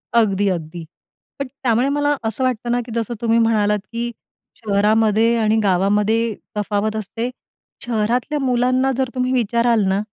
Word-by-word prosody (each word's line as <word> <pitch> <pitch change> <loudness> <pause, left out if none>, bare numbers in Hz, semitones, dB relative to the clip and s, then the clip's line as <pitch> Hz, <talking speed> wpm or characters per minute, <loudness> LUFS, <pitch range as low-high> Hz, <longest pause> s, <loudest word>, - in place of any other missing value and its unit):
अगदी, 205 -3 +3
अगदी. 165 -1 -4 0.5
पण 275 - -2
त्यामुळे 250 -1 0
मला 290 +1 +1
असं 220 +4 -1
वाटतं 245 -2 -1
ना, 245 - +2
की 240 - -10
जसं 230 0 -2
तुम्ही 230 0 +2
म्हणालात 210 -2 +2
की 235 0 -3 0.4
शहरामध्ये 220 +2 +2
आणि 220 0 +2
गावामध्ये 205 +4 +1 0.2
तफावत 210 +1 -1
असते. 225 +3 -3 0.6
शहरातल्या 240 +6 0
मुलांना 255 +1 +2
जर 265 -2 0
तुम्ही 255 0 0
विचाराल 235 -1 +2
ना, 190 +1 +1
225 Hz, 140 wpm, -20 LUFS, 210-245 Hz, 0.6 s, अगदी